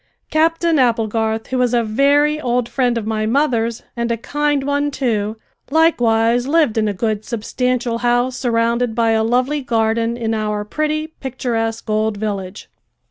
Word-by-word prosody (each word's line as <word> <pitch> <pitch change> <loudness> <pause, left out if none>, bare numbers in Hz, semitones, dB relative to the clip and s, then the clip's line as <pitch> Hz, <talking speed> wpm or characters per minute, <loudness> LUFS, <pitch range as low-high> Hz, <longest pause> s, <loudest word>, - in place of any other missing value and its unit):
Captain 330 0 +2
Applegarth, 225 -2 +1
who 260 - -1
was 245 -1 +2
a 235 - +2
very 285 +7 +2
old 245 -2 0
friend 245 0 0
of 225 - -3
my 215 0 -1
mother's 235 -3 0
and 235 -1 -1
a 230 - 0
kind 295 +3 -1
one 285 +1 0
too, 225 -6 -1 0.3
likewise, 245 -6 +3
lived 305 -6 +2
in 220 -1 +1
a - - +1
good 215 +1 -2
substantial 240 +1 -2
house 245 +1 +1
surrounded 235 -1 0
by 230 -1 +2
a 220 0 +2
lovely 255 +6 +1
garden 230 -1 0
in 225 -2 -2
our 210 -1 -2
pretty, 305 +6 -1
picturesque, 240 -7 -4
old 215 0 0
village. 200 -2 -4
235 Hz, 155 wpm, -19 LUFS, 225-270 Hz, 0.3 s, likewise